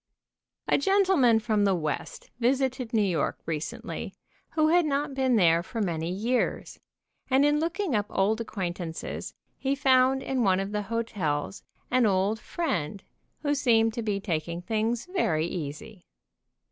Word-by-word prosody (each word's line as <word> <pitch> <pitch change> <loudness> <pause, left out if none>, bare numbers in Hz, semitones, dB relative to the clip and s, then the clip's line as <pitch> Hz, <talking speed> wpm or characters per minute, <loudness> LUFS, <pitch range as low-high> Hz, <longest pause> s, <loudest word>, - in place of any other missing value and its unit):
A - - +3
gentleman 365 - +4
from 215 -2 +1
the 195 -2 +3
West 155 -4 -4
visited 255 -1 0
New 220 -2 +3
York 175 -7 0
re 160 -2 -1
cently, 150 - -6 0.4
who 310 -1 +3
had 350 +2 +5
not 285 -1 -1
been 260 -2 +2
there 170 -5 +4
for 225 +6 -6
many 170 -5 -1
years, 225 +7 -1 0.5
and 270 +2 +4
in 295 0 +3
looking 340 +1 -1
up 210 -2 +1
old 215 +4 +1
acquaintances 175 -6 -5 0.2
he 270 +1 0
found 265 -1 +3
in 265 -2 -1
one 190 -4 +3
of 195 +1 -3
the 210 0 -1
hotels 195 -8 -2 0.3
an 250 -2 +4
old 200 +3 +1
friend 200 - -3 0.4
who 290 -1 +1
seemed 225 -5 +3
to 235 - -3
be 210 -3 -1
taking 170 -3 -3
things 225 +2 -1
very 255 - 0
easy. 175 +5 -6
225 Hz, 150 wpm, -27 LUFS, 185-265 Hz, 0.5 s, had